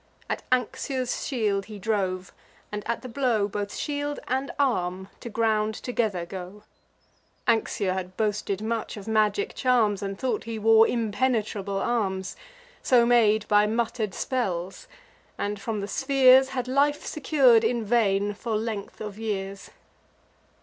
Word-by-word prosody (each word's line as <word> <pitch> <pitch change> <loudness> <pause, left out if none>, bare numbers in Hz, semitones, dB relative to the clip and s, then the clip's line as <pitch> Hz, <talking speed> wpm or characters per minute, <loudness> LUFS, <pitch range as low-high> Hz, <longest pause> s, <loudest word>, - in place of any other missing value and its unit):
At - - -2
Anxur's 255 +1 -1
shield 210 -7 0
he 215 -1 -9
drove; 190 -3 -2 0.4
and, 210 0 -3
at 235 +2 -2
the - - -6
blow, 235 -5 +1
Both 205 0 -4
shield 290 0 -3
and 265 +2 -1
arm 190 -8 0
to 235 - -7
ground 220 -1 +1
together 215 -8 -2
go. 190 +3 -8 0.8
Anxur 205 -4 +1
had 185 -1 -5
boasted 210 -2 -1
much 225 -1 -3
of 205 - -9
magic 220 - +1
charms, 230 -6 +2
And 195 -1 -4
thought 255 0 -2
he 225 -1 -4
wore 225 +1 +6
impenetrable 215 -3 -1
arms, 195 -4 -1 0.5
So 245 -2 +4
made 220 -3 +4
by 210 0 +4
mutter'd 220 -2 -1
spells; 190 -8 -3 0.5
and, 205 0 -3
from 215 -1 -3
the 200 - -4
spheres, 265 +1 +5
Had 255 -2 -3
life 285 +3 +1
secur'd, 265 -6 +4
in 230 0 0
vain, 205 -3 +2
for 220 +2 -3
length 215 -2 -5
of 210 -1 -6
years. 195 -3 -4
220 Hz, 140 wpm, -26 LUFS, 200-245 Hz, 0.8 s, wore